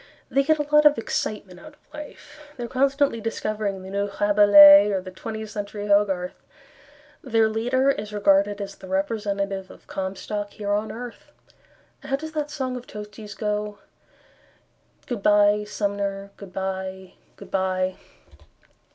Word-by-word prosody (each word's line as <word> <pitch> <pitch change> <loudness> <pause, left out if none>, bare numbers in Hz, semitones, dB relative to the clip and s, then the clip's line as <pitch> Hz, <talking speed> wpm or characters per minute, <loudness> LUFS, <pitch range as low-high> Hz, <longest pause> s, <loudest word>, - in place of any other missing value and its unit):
They 275 - +3
get 310 +3 +2
a 295 - 0
lot 300 0 +8
of 295 - +3
excitement 210 -4 -4
out 305 -1 -13
of - - -34
life, 300 0 -11 0.2
They 240 - -5
are - - -4
constantly 275 -1 +1
discovering 215 -3 -3
The 190 - -9
New 200 +1 -1
Rabelais 205 -1 +8
Or 195 - 0
the 185 0 -9
Twentieth 220 +2 -7
Century 205 0 -5
Hogarth. 195 -3 +1 0.8
Their 225 -4 +2
leader 245 +5 +1
is 210 -5 -5
regarded 200 0 +2
As 200 -1 -5
the 190 - -13
representative 200 -1 -2
of - - -15
Comstock 200 +2 -5
here 205 -1 -4
on 210 +1 -1
earth. 240 0 -9 0.7
How 275 -1 -2
does 315 +3 -6
that 300 -2 -3
song 265 -4 -3
of 250 0 -8
Tosti's 210 0 -9
go? 210 -1 -3 1.3
"Good 240 -5 -4
bye, 205 0 +4
Sumner, 200 -1 -3
good 200 -2 -11
bye, 190 0 -5 0.2
good - - -13
bye." 185 -1 0
205 Hz, 150 wpm, -24 LUFS, 195-230 Hz, 1.3 s, lot